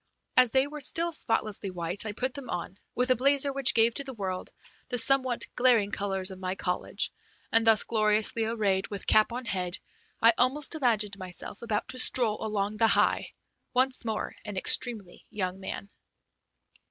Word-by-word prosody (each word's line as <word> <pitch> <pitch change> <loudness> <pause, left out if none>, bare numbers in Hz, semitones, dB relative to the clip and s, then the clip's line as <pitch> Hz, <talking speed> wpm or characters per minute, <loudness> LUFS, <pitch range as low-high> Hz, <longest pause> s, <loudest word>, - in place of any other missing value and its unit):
As 255 -1 +5
they 265 +3 +3
were 295 +1 -8
still 335 +5 +2
spotlessly 215 -9 -1
white, 180 +3 0
I - - -2
put 250 +5 -3
them 280 -4 -8
on, 180 +2 -5 0.2
with 250 +1 +2
a - - +5
blazer 275 +2 +3
which 270 -1 +3
gave 230 0 +4
to 280 - -3
the 265 -2 -8
world 185 -3 -4 0.4
the 245 - -1
somewhat 255 0 +1
glaring 235 -5 +3
colors 195 -2 -1
of 185 - -9
my 185 0 -3
college, 180 -2 -2 0.4
and, 225 0 +3
thus 220 -2 +6
gloriously 215 +1 +1
arrayed 205 -4 0
with 200 -2 -3
cap 215 +2 +4
on 250 +2 -5
head, 185 -4 -3 0.4
I 230 +1 +6
almost 270 +6 +1
imagined 220 -9 0
myself 185 +2 -7
about 220 -3 -2
to 255 - -3
stroll 235 -4 0
along 210 -1 -2
the 225 +1 +4
High, - - +2 0.4
once 260 +1 +2
more 220 -2 -3
an 205 -2 -6
extremely 210 -2 +1
young 185 -2 -3
man. 195 +1 -7
220 Hz, 175 wpm, -28 LUFS, 200-255 Hz, 0.4 s, thus